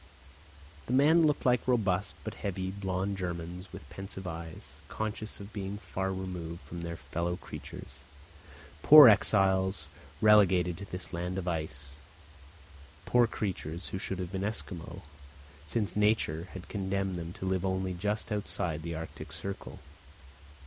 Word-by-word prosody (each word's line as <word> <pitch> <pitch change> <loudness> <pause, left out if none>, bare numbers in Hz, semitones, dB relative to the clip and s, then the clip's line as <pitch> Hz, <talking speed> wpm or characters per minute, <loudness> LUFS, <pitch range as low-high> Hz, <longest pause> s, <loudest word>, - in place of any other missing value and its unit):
The 125 - -1
men 155 +5 +6
looked 150 - 0
like 125 -1 +3
robust 105 -6 +1
but - - -4
heavy, 95 -1 -3
blond 95 0 -2
Germans 90 +1 -5
with 95 +1 -10
pensive 95 -1 -7
eyes, 80 -4 -8
conscious 110 +2 -4
of 100 +1 -10
being 100 -1 -4
far 95 -2 -3
removed 90 -3 -5
from 85 - -8
their 85 0 -4
fellow 85 +1 -2
creatures, 65 +1 -9 0.8
poor 150 -2 +11
exiles 95 -3 +4 0.3
relegated 95 -5 +5
to 100 - -6
this 90 -1 -7
land 90 +2 -2
of 95 -1 -3
ice, 70 -5 -4 1.1
poor 120 -1 +4
creatures 90 -6 -4
who 95 - -4
should 95 -1 -3
have 90 -1 -4
been 95 0 -2
Esquimaux, 95 -3 -5 0.6
since 105 +5 -1
nature 105 -6 +2
had 95 -1 -8
condemned 95 -1 -1
them 85 -1 -5
to 95 - -6
live 95 -1 0
only 95 -1 0
just 105 +5 -2
outside 90 -6 -2
the 85 0 -4
arctic 80 -1 -7
circle! 90 +5 -6
95 Hz, 140 wpm, -31 LUFS, 85-100 Hz, 1.1 s, poor